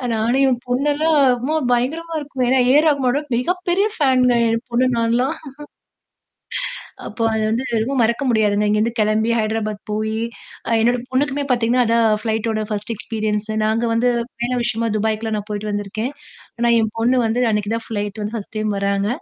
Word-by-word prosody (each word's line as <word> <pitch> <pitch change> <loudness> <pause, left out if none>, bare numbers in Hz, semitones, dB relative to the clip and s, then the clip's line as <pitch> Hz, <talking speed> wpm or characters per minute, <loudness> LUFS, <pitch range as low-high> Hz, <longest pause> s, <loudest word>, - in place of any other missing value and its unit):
நானும் 235 +5 +1
என் 245 -2 0
பொண்ணெல்லாம் 295 +5 +1 0.2
"அம்மா 280 +6 -2 0.2
பயங்கரமா 320 +7 -1
இருக்கு." 270 -3 -2
ஏன்னா 260 0 +4
ஏ - - +5
ஆர் 315 - +2
ரகுமானோட 275 -1 +1 0.2
மிகப்பெரிய 360 +7 0
ஃபேன்ங்க 255 -4 +3 0.2
என் 230 +2 -1
பொண்ணு, 250 +2 +2
நான்லாம். 240 +6 +1 1.7
அப்போ 230 - -5
அது 220 - 0
வந்து 240 +4 -1
எதுவும் 245 +4 0
மறக்க 235 +5 0
முடியாதுங்க. 210 -2 +2
இங்கேருந்து 220 +3 +1
கிளம்பி 215 +2 +2
ஹைதராபாத் 215 -1 -2
போயி 220 +1 -1 0.5
அ - - -1
என்னோட 245 +1 +2
பொண்ணுக்குமே 280 +2 0
பார்த்தீங்கன்னா, 245 +1 +2
அதான் 230 0 +3
ஃப்ளைட்டோட 220 -1 -1
1 210 +2 -3
எக்ஸ்பீரியன்ஸ். 215 -1 -3 0.2
நாங்க 225 +2 +1
வந்து 245 +2 +2 0.3
பயண 240 +1 -2
விஷயமா 230 0 -1
துபாய்க்குலாம் 220 0 -1
நான் 205 +1 -8
போயிட்டு 210 0 -3
வந்திருக்கேன். 205 +5 -3 0.5
ஆனா 235 0 +2
என் 220 -1 0
பொண்ணு 245 +3 +2
வந்து 230 +3 0
அன்னக்கி 210 -1 0
தான் 230 0 -2
ஃப்ளைட் 205 -1 -4
வந்து 210 +2 -4
ஃபர்ஸ்ட் 220 0 -6
டைம் 215 0 -1
வராங்க. 200 +1 0
230 Hz, 160 wpm, -20 LUFS, 215-255 Hz, 1.7 s, ஏ